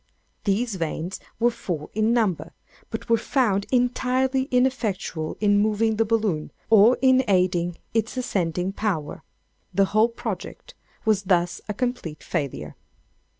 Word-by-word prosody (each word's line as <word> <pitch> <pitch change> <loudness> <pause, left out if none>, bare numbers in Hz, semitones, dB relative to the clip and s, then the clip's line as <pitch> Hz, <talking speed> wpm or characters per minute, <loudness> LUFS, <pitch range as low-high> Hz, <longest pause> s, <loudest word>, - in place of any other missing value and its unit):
These 210 +1 0
vanes 165 +2 -3 0.2
were 240 +1 +3
four 165 -9 -5
in 220 +2 +2
number, 220 -8 0 0.4
but - - -5
were 230 -1 +3
found 210 -6 +1
entirely 255 +1 +1
ineffectual 230 - -1
in 205 -1 +3
moving 215 +1 +1
the 225 - +3
balloon, 210 -8 0 0.2
or 220 +3 +7
in 260 0 +5
aiding 180 -3 +1 0.2
its 225 +2 -1
ascending 185 -5 -1
power. 185 -9 -2 0.5
The 195 - +5
whole 220 +2 +5
project 240 - -6 0.3
was 210 -3 +2
thus 175 -2 +1
a 210 - -2
complete 245 -11 -3
failure. 140 - -4
210 Hz, 130 wpm, -24 LUFS, 180-240 Hz, 0.5 s, or